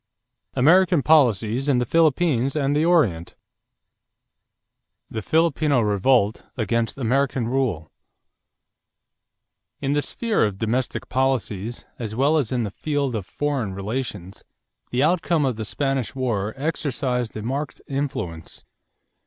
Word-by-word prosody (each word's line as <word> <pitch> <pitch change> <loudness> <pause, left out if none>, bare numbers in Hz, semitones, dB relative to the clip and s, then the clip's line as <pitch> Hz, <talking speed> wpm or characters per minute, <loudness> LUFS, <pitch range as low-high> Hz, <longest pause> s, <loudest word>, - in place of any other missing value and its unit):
AMERICAN 170 +3 +4
POLICIES 125 -3 +3
IN 135 - +3
THE 125 - +1
PHILIPPINES 155 -3 +2
AND 145 -1 +1
THE 150 - +2
ORIENT 120 - +2 1.8
=The 110 - -3
Filipino 155 -1 +2
Revolt 105 +1 +2
against 115 +1 -1
American 130 -1 0
Rule.= 120 - -1 1.9
In 140 0 -1
the 145 - +2
sphere 230 +7 0
of 105 -3 -1
domestic 115 +4 -2
politics, 120 -4 -1
as 110 -3 -4
well 140 +6 +3
as 135 -5 -2
in 125 -2 0
the 105 - -4
field 145 +1 -2
of 105 -5 -4
foreign 135 -10 -2
relations, 100 -2 -5 0.5
the 125 +2 +1
outcome 165 -1 +2
of 130 -3 0
the 110 0 -5
Spanish 135 +2 -2
war 110 -6 -1
exercised 130 -5 -2
a 105 - -5
marked 140 +5 -3
influence. 130 - -5
130 Hz, 120 wpm, -23 LUFS, 110-145 Hz, 1.9 s, AMERICAN